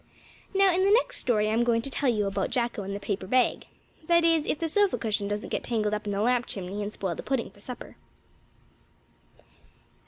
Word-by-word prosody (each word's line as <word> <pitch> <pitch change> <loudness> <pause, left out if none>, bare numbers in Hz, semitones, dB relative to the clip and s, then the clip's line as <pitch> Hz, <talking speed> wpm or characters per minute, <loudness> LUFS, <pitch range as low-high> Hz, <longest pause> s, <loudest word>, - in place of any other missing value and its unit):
Now, 390 -1 +5
in 370 +2 +2
the 390 - +4
next - - +3
story 215 -4 +2
I'm 225 +2 +2
going 230 -1 +1
to 275 - -3
tell 275 0 +1
you 210 -4 +1
about 195 0 -1
Jacko 235 -3 -1
and 195 0 -5
the - - -4
paper 200 -2 -3
bag 255 +3 +1 0.4
that 340 -1 +4
is, 325 -2 +3
if - - 0
the 330 - -2
sofa 405 +4 +2
cushion 210 -3 -1
doesn't 205 +1 -3
get - - -2
tangled 215 -3 -1
up 210 0 -3
in - - -1
the 200 0 -1
lamp 245 +2 +2
chimney 195 +1 -4
and 205 0 -3
spoil 190 -4 -3
the - - -6
pudding 265 -3 -2
for 205 - -19
supper. 250 +3 -9
230 Hz, 215 wpm, -27 LUFS, 205-280 Hz, 0.4 s, Now